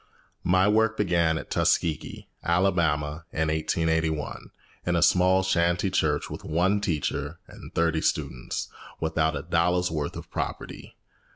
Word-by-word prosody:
My 95 +2 +3
work 110 +1 +3
began 85 -5 +2
at - - -8
Tuskegee, 80 -2 0 0.2
Alabama, 85 -4 +1
in 80 0 0
1881, 80 0 -1 0.4
in 90 - +2
a 85 - +2
small 95 +1 +4
shanty 85 +1 +1
church, 75 -5 +1
with - - -8
one 90 +6 +1
teacher 75 -4 -2
and - - -12
thirty 80 -1 +2
students, 60 - -2 0.3
without 80 -1 0
a 70 - -5
dollar's 90 +2 +1
worth 75 -3 -3
of - - -10
property. - - -5
85 Hz, 130 wpm, -26 LUFS, 80-90 Hz, 0.4 s, small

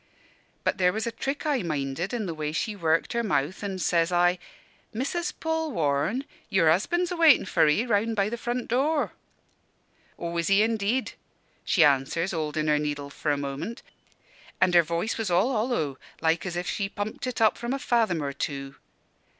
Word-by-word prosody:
"But - - 0
there 180 -1 +4
was 220 +3 -3
a 235 - -2
trick 275 +6 -4
I 290 -5 +1
minded 155 +1 -2
in 235 -3 -2
the 170 - -3
way 155 -1 -3
she 210 +6 -2
worked 165 0 +1
her 235 - +1
mouth, 185 -6 -1
an' 195 -2 -3
says 170 -2 +1
I, 175 +1 +3 0.5
'Missus 285 +9 -2
Polwarne, 245 - -1 0.2
your 165 -5 +4
husband's 345 - +1
a - - -1
waitin' 325 - +6
for 165 -4 +3
'ee, 150 +11 +2
round 225 0 +1
by 200 -1 +2
the 225 - -3
front 240 +1 -3
door.' 285 +6 +1 1.0
"'Aw, 170 0 -4
is 170 - 0
he 195 +2 +5
indeed?' 225 +3 0 0.5
she 175 - +4
answers, 145 +5 +2
holdin' 155 -2 -2
her 150 -1 +3
needle 145 -1 -3
for 150 - -3
a 145 - +2
moment 140 +11 -5 0.8
an' 185 -1 +3
her 175 - +8
voice 170 +8 -2
was 220 -4 -1
all 185 +9 +3
hollow, 215 - -1 0.2
like 165 +3 +1
as 175 - -4
if 175 0 -3
she 195 +1 -2
pumped 210 +4 -4
it 250 -2 -3
up 220 -1 +4
from 235 +1 -4
a 275 - 0
fathom 225 - +1
or 140 -1 -3
two. 135 -1 -5
185 Hz, 185 wpm, -26 LUFS, 160-235 Hz, 1.0 s, her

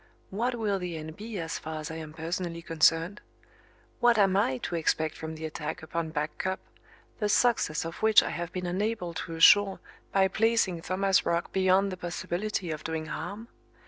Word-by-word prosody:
What 240 +5 -1
will 210 -4 0
the 175 -2 -4
end 155 0 -7
be 215 +1 -6
as 165 -2 -3
far 155 0 -5
as 155 +1 -6
I 160 - -5
am 160 -1 -7
personally 170 +1 -4
concerned? 165 +4 +2 0.8
What 240 -1 +5
am 195 -2 +4
I 130 -10 +2
to - - -3
expect 160 -1 0
from 160 0 -6
the 160 0 -6
attack 155 +1 -5
upon 165 0 -3
Back 150 -1 -3
Cup, 190 +1 -1 0.6
the 210 -1 0
success 205 -9 +2
of 165 - -6
which 220 -1 +6
I - - -3
have 175 0 -4
been 180 -1 -4
unable 185 0 -2
to 165 0 -5
assure 195 +4 +6 0.3
by 195 -1 +4
placing 215 -4 +1
Thomas 190 +2 +2
Roch 170 0 -1
beyond 190 +1 +3
the 185 - -5
possibility 175 +1 -3
of 155 -1 -5
doing 160 -1 -3
harm? 180 +9 -6
175 Hz, 185 wpm, -28 LUFS, 160-200 Hz, 0.8 s, which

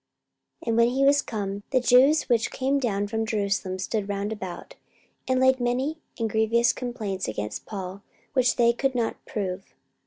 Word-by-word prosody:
44:025:007 - - -15
And 225 - +1
when 235 0 +6
he 270 +2 +1
was 285 +1 +5
come, 205 -4 -4
the 260 - +3
Jews 260 +5 +5
which 235 -3 +1
came 270 +2 0
down 205 -6 0
from 225 +2 -2
Jerusalem 200 -3 -1
stood 200 +2 -2
round 200 +1 -2
about, 190 -5 -7 0.5
and 260 -1 +2
laid 260 0 +4
many 255 +6 -1 0.2
and 230 - 0
grievous 220 +3 +2
complaints 220 -7 -4
against 105 -1 -5
Paul, 195 -1 -6 0.3
which 255 -2 +3
they 235 -1 +4
could 270 +2 -1
not 235 -2 -2
prove. 190 -2 -4
225 Hz, 175 wpm, -26 LUFS, 200-255 Hz, 0.5 s, when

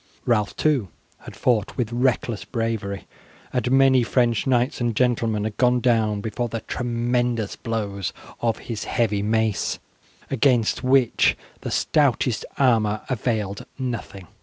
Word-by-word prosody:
Ralph 105 -4 +1
too 140 -10 +1 0.4
had - - -9
fought 115 -5 0
with 120 -3 -1
reckless 120 -4 0
bravery, 110 -2 -3 0.5
and 125 -1 0
many 135 -1 +5
French 120 0 +1
knights 125 +1 +1
and 120 -2 0
gentlemen 115 -3 +1
had 110 -1 -4
gone 125 -1 +3
down 110 -4 +2
before 115 +3 -3
the 115 0 -4
tremendous 120 -2 -1
blows 100 -6 -3 0.3
of 115 -2 0
his 115 -3 -4
heavy 105 -4 0
mace, 110 0 0 0.5
against 125 -4 +2
which 130 -1 +3 0.2
the - - -5
stoutest 130 -5 +1
armour 110 -6 +2
availed 110 -6 -2
nothing. 115 -7 -5
115 Hz, 130 wpm, -23 LUFS, 110-125 Hz, 0.5 s, many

